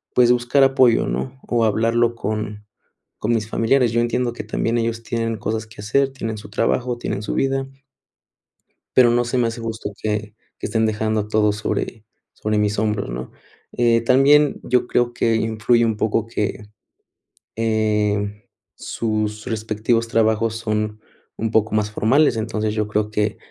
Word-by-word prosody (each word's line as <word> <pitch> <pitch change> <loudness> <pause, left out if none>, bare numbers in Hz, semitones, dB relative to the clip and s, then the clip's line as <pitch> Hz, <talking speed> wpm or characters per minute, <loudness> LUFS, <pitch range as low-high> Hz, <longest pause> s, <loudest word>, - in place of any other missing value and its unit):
pues, 125 -1 +5
buscar 125 +3 +3
apoyo, 130 -3 +4
¿no?, 65 - -4
o 115 -2 +2
hablarlo 115 +2 +2
con 105 -1 -4 0.5
con 115 +3 0
mis 110 -1 -1
familiares. 120 +1 +2
Yo 115 - +1
entiendo 120 +1 0
que - - -6
también 115 +1 -1
ellos 115 0 -2
tienen 115 -1 -2
cosas 110 +2 -3
que 110 -2 -12
hacer, 135 +6 +1
tienen 115 -4 -4
su 105 - -10
trabajo, 120 +3 0
tienen 110 - -3
su - - -3
vida 135 0 0 1.3
pero 125 -2 +7
no 120 0 +2
se 120 +2 -1
me 120 - +2
hace 115 +1 -5
justo 110 -2 -4
que 105 0 -3 0.2
que - - -3
estén 110 -1 +1
dejando 110 -1 -1
todo 105 -1 +2
sobre 105 +1 -3 0.3
sobre 105 0 -2
mis 105 0 +1
hombros, 105 - -1
¿no?, 60 +1 -6 0.4
eh, 120 -1 +3
también 140 +4 +4
yo 125 0 +1
creo 120 0 +1
que 115 -1 +1
influye 110 +2 +2
un 110 -2 0
poco 110 +1 0
que, 105 -1 -3 0.9
eh, 105 -2 0 0.3
sus 110 -1 -3
respectivos 110 +1 -1
trabajos 110 0 +1
son 105 -1 -2 0.4
un 110 0 -2
poco 110 -1 +2
más 105 -1 +1
formales. 125 +5 +3
Entonces, 110 -1 -2
yo 105 -1 -1
creo 105 0 -1
que 105 0 -1
110 Hz, 160 wpm, -21 LUFS, 105-120 Hz, 1.3 s, pero